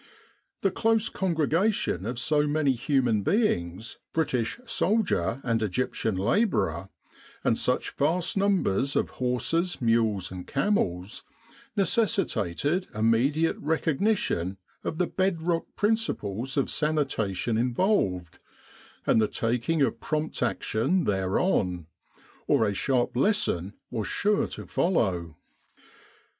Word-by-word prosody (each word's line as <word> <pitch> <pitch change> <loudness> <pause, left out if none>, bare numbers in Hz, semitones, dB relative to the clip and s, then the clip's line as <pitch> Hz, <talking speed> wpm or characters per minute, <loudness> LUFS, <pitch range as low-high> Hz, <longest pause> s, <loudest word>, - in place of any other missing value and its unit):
The - - +3
close 225 0 +1
con 185 -3 -1
gregation 160 - +1
of 120 +1 -3
so 150 +4 +1
many 145 -1 +2
human 120 -3 +1
beings, 100 - -1
British 135 - -1
soldier 190 - +1
and 115 -2 0
Egyptian 110 0 -1
labourer, 95 - 0 0.5
and - - +3
such - - 0
vast 170 +5 0
numbers 180 - +1
of - - 0
horses, 165 +8 0
mules, 110 -6 +1
and 90 -1 -8
camels, 95 - -1 0.5
necessitated 185 - +1
immediate 125 +9 +2
recognition 155 - 0 0.3
of 160 - -3
the 180 - +2
bedrock 170 -3 0
principles 135 - -1
of 140 - +2
sanitation 135 - 0
involved, 120 - 0 0.7
and 110 - +4
the 110 - +3
taking 125 +9 0
of - - 0
prompt 155 0 -3
action 125 - 0
thereon, 95 - 0 0.6
or 110 - +3
a 100 - 0
sharp 125 +4 0
lesson 120 - +1 0.2
was 110 -4 -2
sure 210 0 +1
to - - -7
follow. 90 - 0
130 Hz, 110 wpm, -27 LUFS, 105-180 Hz, 0.7 s, and